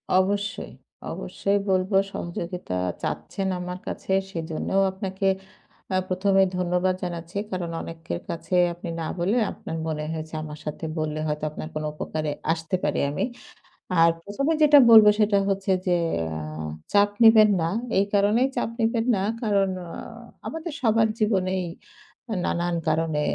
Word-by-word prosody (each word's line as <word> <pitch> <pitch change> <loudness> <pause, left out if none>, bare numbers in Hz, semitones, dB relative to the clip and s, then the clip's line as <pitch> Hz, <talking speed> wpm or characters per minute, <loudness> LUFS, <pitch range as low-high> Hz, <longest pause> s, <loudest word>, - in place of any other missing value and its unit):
অবশ্যই। 200 +2 0 0.4
অবশ্যই 200 +1 -1
বলব, 185 +1 +1 0.2
সহযোগিতা 170 - -4 0.2
চাচ্ছেন 195 -1 -3
আমার 180 0 -5
কাছে, - - -5 0.2
সেজন্যও 165 +3 -1
আপনাকে 190 0 -3 0.7
আ - - +3
১ম 190 +2 +1
এই - - +2
ধন্যবাদ 180 +1 +1
জানাচ্ছি, 170 0 -5
কারণ 180 -3 -3
অনেকের 165 - -6
কাছে 170 +2 -3 0.2
আপনি 175 0 -7
না - - -2
বলে 195 +7 +1
আপনার 165 - -6
মনে 150 -1 -2
হয়েছে, 160 0 -6
আমার 150 -1 -8
সাথে 150 +2 -5
বললে 155 0 -2
হয়তো 150 0 -3
আপনার 155 - -6
কোন 155 - -2
উপকারে 155 0 -3 0.2
আসতে 165 +1 -3
পারি - - +1
আমি। 185 - -1 0.8
আর 165 - +7
১ম 205 +9 -3
এ - - +1
যেটা 295 -1 +8
বলব, 220 -2 +10
সেটা 210 -1 +4
হচ্ছে 195 0 0 0.2
যে 175 -1 +3 0.4
আ - - -4 0.5
চাপ 205 0 +5
নিবেন 220 -1 +8
না, 165 - +1 0.3
এই 200 - +3
কারণেই 210 +6 +4
চাপ - - 0
নিবেন 225 0 +1
না, 190 - -1 0.2
কারণ 200 -3 +2 0.2
আ - - -9 0.6
আমাদের 325 0 -5
সবার 225 -2 +4
জীবনেই 190 -4 +1 0.8
নানান 175 0 0
কারণে 160 -1 +1
185 Hz, 145 wpm, -25 LUFS, 165-205 Hz, 0.8 s, বলব